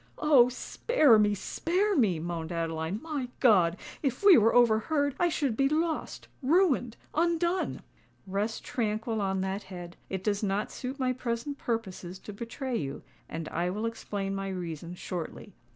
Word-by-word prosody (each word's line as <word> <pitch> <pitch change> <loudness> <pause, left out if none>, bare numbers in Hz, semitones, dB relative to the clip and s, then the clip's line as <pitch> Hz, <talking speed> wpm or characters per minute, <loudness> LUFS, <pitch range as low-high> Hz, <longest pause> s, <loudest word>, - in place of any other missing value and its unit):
"Oh! 275 -6 +6
spare 265 - +3
me—spare 335 - +1
me!" 210 - +3
moaned 165 0 -4
Adeline. 165 +2 -2
"My 295 -6 -3
God! 185 -8 +5 0.2
if 275 +5 -2
we 400 -3 +9
were 225 -1 +5
overheard! 245 +5 +3
I 350 - +3
should 280 -7 0
be 275 +3 +2
lost—ruined—undone!" 330 - 0 0.4
"Rest 205 +3 -2
tranquil 220 -1 -1
on 190 -1 0
that 190 +2 -2
head:—it 185 0 -8
does 205 -1 0
not 205 0 -1
suit 260 +2 -5
my 255 -2 +1
present 250 +3 -3
purposes 190 -6 -3
to 210 - -9
betray 235 +4 -4
you—and 155 +2 -7
I 175 +2 -1
will 210 +5 -2
explain 205 -3 -3
my 195 0 -3
reason 175 -2 -5
shortly. 180 +3 -6
220 Hz, 135 wpm, -29 LUFS, 190-275 Hz, 0.4 s, we